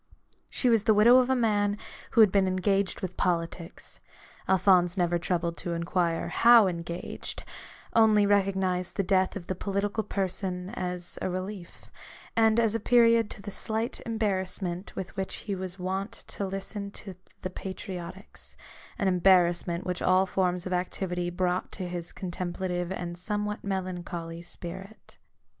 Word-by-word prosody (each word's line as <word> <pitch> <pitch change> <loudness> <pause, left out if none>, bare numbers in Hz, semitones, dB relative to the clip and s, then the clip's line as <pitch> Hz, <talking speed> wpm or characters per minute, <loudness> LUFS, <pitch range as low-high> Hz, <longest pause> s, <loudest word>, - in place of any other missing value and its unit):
She 255 - +1
was 225 -3 +4
the 220 - +5
widow 235 +4 +7
of 255 0 +3
a 265 - +3
man 205 -4 +1 0.4
who 230 - +6
had 210 -3 +7
been 195 -1 +3
engaged 190 +1 0
with 185 -1 -5
politics: 170 0 -3 0.5
Alphonse 185 -1 +4
never 175 -1 +2
troubled 170 -1 -1
to 175 - -3
inquire 170 0 0
how 235 -2 +7
engaged; 170 -1 -4 0.5
only 215 -2 +5
recognised 190 -3 +1
the 195 - +1
death 190 0 +2
of 190 -4 -6
the 185 - -2
political 200 +3 -2
person 185 -2 -2
as 180 -5 -4
a - - -1
relief, 185 0 -6 0.5
and 225 0 +4
as 225 -2 +3
a 230 - 0
period 230 -1 +4
to 200 - -8
the 205 - -6
slight 220 +4 -2
embarrass 205 -5 -1
ment 180 0 -5
with 190 +1 -6
which 190 -1 -3
he 205 - -2
was 185 -1 -5
wont 190 +3 -3 0.2
to 200 - -3
listen 195 +1 -5
to 200 -1 -8 0.3
the 185 - -3
patriotics 185 0 -7 0.2
— - - -19
an 200 -5 0
embarrassment 180 -1 +3
which 180 -1 -3
all 185 +1 +4
forms 180 -2 0
of 185 - -2
activity 180 0 -2
brought 180 0 -1
to 185 - -4
his 175 -1 -5
contemplative 180 0 -3
and 175 -2 -5
somewhat 210 +2 -2
melancholy 175 -3 -4
spirit. 190 +4 -10
190 Hz, 155 wpm, -28 LUFS, 180-205 Hz, 0.5 s, widow